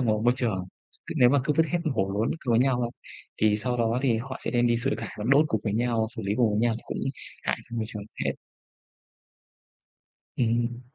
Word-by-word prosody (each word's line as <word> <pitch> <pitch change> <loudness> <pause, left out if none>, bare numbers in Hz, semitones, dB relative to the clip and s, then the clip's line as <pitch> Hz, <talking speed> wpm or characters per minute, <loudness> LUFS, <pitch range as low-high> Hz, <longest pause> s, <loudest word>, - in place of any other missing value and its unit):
ngoài 110 -4 +2
môi 120 - +5
trường, 110 -8 0 0.4
cứ - - -5
nếu 125 - +7
mà 145 - +4
cứ 150 - +2
vứt 160 - +4
hết 175 - 0 0.2
hổ 95 -4 0
lốn 105 +3 +1
cùng 120 - +1
với 115 - +5
nhau, 125 -2 +2 0.5
thì 105 -1 +3
sau 125 +3 -1
đó 115 0 +1
thì 125 -5 +3
họ 130 +3 -6
sẽ - - -1
đem 120 -1 +3
đi 120 0 +3
xử 125 +4 0
thải - - -5
và 105 - -4
đốt 140 +3 +6
cùng 110 - 0
với 105 - 0
nhau, 115 -1 +1
xử 110 - -4
lý 100 0 -1
cùng 120 -3 +3
với 105 +1 +1
nhau 115 -1 +2
cũng - - -4 0.4
hại - - 0
cho 120 - -5
môi 115 - 0
trường 105 -2 -6 0.2
phết. - - 0 2.0
Ừm. 120 0 0
120 Hz, 225 wpm, -27 LUFS, 110-125 Hz, 2.0 s, nếu